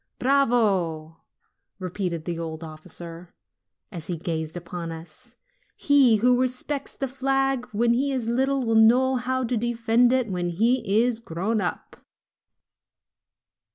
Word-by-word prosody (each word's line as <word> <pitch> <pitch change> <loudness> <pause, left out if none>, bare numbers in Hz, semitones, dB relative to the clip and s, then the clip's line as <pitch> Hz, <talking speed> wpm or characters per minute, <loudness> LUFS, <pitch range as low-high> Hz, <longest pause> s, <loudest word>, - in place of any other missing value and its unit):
"Bravo 200 - +1 0.3
!" - - -54
repeated 180 -3 -4
the 170 -1 -3
old 160 0 -5
officer, 165 +2 -10 0.6
as 170 -5 -7
he 175 - -3
gazed 160 0 -4
upon 170 -1 -6
us; 175 +10 -11 0.4
"he 275 -5 +5
who 245 +3 +3
respects 260 +3 -3
the 270 - -3
flag 270 0 0
when 235 +3 +2
he 275 +4 0
is 255 -4 -2
little 265 +2 +1
will 225 - +1
know 250 +4 +5
how 260 +1 -1
to 245 0 -1
defend 235 +1 +2
it 255 -2 +1
when 180 -3 -2
he 225 +3 +2
is 240 -2 -1
grown 210 +2 -2
up." 180 - -5
225 Hz, 135 wpm, -25 LUFS, 175-255 Hz, 0.6 s, he